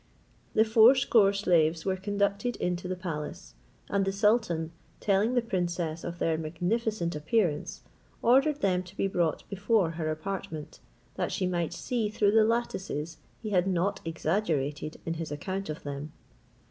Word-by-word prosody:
The 220 - +5
fourscore 225 -1 +6
slaves 170 -5 +2
were 190 -1 +1
conducted 200 +4 -1
in 180 0 -1
to 180 - -7
the 185 - -2
palace; 160 - -6 0.3
and 200 -1 +1
the 195 - 0
sultan, 200 -6 +1 0.3
telling 210 +4 +2
the 245 - +3
princess 175 -6 -2
of 170 - -5
their 160 -2 0
magnificent 175 +3 -1
appearance, 155 0 0 0.4
ordered 275 +5 +4
them 185 -2 +2
to 185 +2 -14
be - - +1
brought 175 -5 0
before 200 -2 +1
her 160 -1 -3
apartment, 160 -1 -5 0.4
that - - -1
she 185 - -1
might 175 -3 -1
see 230 -4 -2
through 205 -1 +2
the 220 0 +5
lattices 190 -8 -2 0.3
he 215 - -3
had 185 -1 +3
not 185 +1 0
exaggerated 160 -3 -1
in 165 - -1
his 165 -2 -5
account 190 +6 -4
of 155 - -5
them. 145 +1 -5
185 Hz, 155 wpm, -29 LUFS, 165-210 Hz, 0.4 s, fourscore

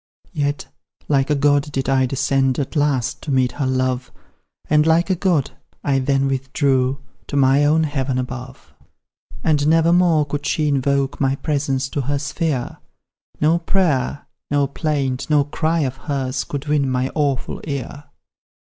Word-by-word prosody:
Yet, 145 -2 -1 0.4
like 140 -1 +2
a 150 - +3
god 145 +1 +2
did 135 -2 -2
I 135 -1 +2
descend 135 0 +1
At 140 +3 -3
last, 145 -5 0
to - - -7
meet 130 -2 +2
her 135 +1 -2
love; 130 -1 -1 0.6
And, 150 +1 +3
like 170 +3 +3
a - - +3
god, 170 -6 +1 0.3
I 135 -2 +1
then 135 +1 +1
withdrew 135 0 0 0.3
To - - -5
my 135 +1 +4
own 155 +2 +3
heaven 135 -3 -1
above. 130 0 -6 0.7
"And 150 -2 +2
never 165 +1 +4
more 170 -4 +4
could 145 0 -4
she 155 0 0
invoke 140 0 0
My 135 0 +2
presence 140 -2 -1
to 145 - -2
her 140 +2 -1
sphere; 140 -2 -2 0.6
No 160 +3 +3
prayer, 155 -7 0 0.2
no 145 0 +2
plaint, 140 -2 -2
no 150 -2 +4
cry 160 +3 -1
of 135 -2 -2
hers 135 -3 -3
Could 145 0 -5
win 145 -2 +1
my 130 +1 -1
awful 140 -4 -1
ear. 145 0 -5
140 Hz, 155 wpm, -20 LUFS, 130-150 Hz, 0.7 s, my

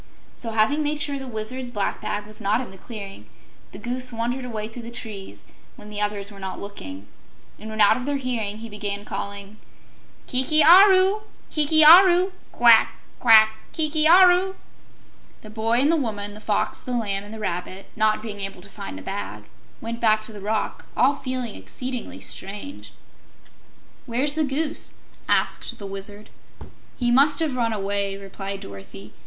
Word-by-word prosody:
So, 230 -2 -6
having 225 +8 +2
made 300 0 -1
sure 285 -2 -1
the 265 - -7
Wizard's 245 +2 -4
black 205 -4 -2
bag 205 0 -3
was 215 +1 -10
not 210 +2 +1
in 255 - -6
the 190 - -12
clearing, 200 -3 -9 0.4
the - - -9
Goose 250 +1 -3
wandered 240 +3 -3
away 215 -3 -4
through 225 +2 -9
the 235 - -8
trees 215 -5 -8 0.3
when 210 - -12
the 210 0 -4
others 205 -1 -2
were 200 - -12
not 190 -1 -5
looking, 100 - -9 0.5
and 220 - -8
when 220 0 -2
out 205 - +6
of 250 +2 -6
their 290 - 0
hearing, 230 -6 -3
he 230 +1 -8
began 205 -1 -5
calling, 200 +1 -6 0.7
"Kiki 280 +5 +2
Aru! 380 +4 +7 0.3
Kiki 310 0 +4
Aru! 360 +3 +8 0.2
Quack - - +5 0.2
quack! 220 -3 +7 0.2
Kiki 310 -1 +1
Aru!" 365 +2 +6 0.9
The 215 - -11
Boy 220 +1 -1
and 290 +3 +4
the - - +3
Woman, 205 -7 -3
the 210 - -10
Fox, 215 -1 -1
the 250 - -5
Lamb, 200 -3 -1
and 205 - -11
the 220 - -7
Rabbit, 185 -1 -5
not 215 0 +1
being 210 -2 -6
able 195 -2 -6
to 200 - -10
find 95 - -8
the 95 - -9
bag, 105 +2 -6 0.3
went 230 +1 -5
back 215 -2 +3
to 220 - -10
the 205 - -9
rock, 215 +2 -3
all 265 +3 +4
feeling 255 -5 -4
exceedingly 255 -1 -6
strange. 205 +9 -5 1.2
"Where's 260 +5 0
the 310 0 +1
Goose?" 295 +3 -2 0.3
asked 235 - 0
the 205 - -8
Wizard. 200 +2 -4 0.7
"He 240 -2 +1
must 280 +3 +5
have 310 -4 0
run 235 -2 0
away," 200 -1 -1
replied 195 0 -6
Dorothy. 100 +1 -11
220 Hz, 170 wpm, -23 LUFS, 205-265 Hz, 1.2 s, Aru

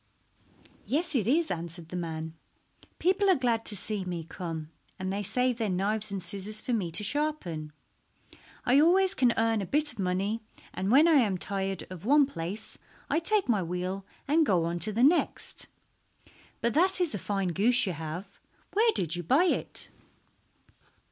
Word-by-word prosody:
"Yes, 320 +4 +1
it 225 -7 +1
is," 315 +6 +2
answered 170 -1 -6
the 180 - -6
man. 160 -2 -4 0.6
"People 385 +3 +2
are 375 - +6
glad 235 -4 0
to 210 - -3
see 205 0 -2
me 175 -2 -4
come, 160 -2 -6 0.3
and 185 0 -3
they 200 - -2
save 250 +4 0
their 220 -2 0
knives 205 +4 -1
and 195 -2 -4
scissors 200 +4 -3
for 250 - -3
me 200 -7 0
to 170 +6 -1
sharpen. 205 - -2 0.9
I 255 +3 +5
always 365 +4 +4
can 250 -2 +3
earn 225 -1 +2
a - - -3
bit 295 +4 +1
of - - -18
money, 195 +4 -1 0.3
and 190 - -2
when 285 +8 +6
I 320 -4 +6
am 200 -5 0
tired 195 +1 -2
of 180 -2 -8
one 285 +5 +5
place 195 -3 -7 0.3
I - - +3
take 410 +4 +1
my 215 -6 +2
wheel 180 +3 -3 0.2
and 315 +3 +4
go 185 - +2
on 170 +1 -2
to 215 - +2
the 230 +4 +1
next. 315 +6 +1 0.9
But 235 -1 +1
that 370 +6 +3
is 350 -7 0
a 205 - -3
fine 195 -2 -1
goose 220 +9 +3
you 185 - -2
have. 165 +5 -7 0.3
Where 450 +3 +4
did 165 - -1
you 175 - -3
buy 265 - +3
it?" 360 - -2
210 Hz, 180 wpm, -29 LUFS, 180-280 Hz, 0.9 s, are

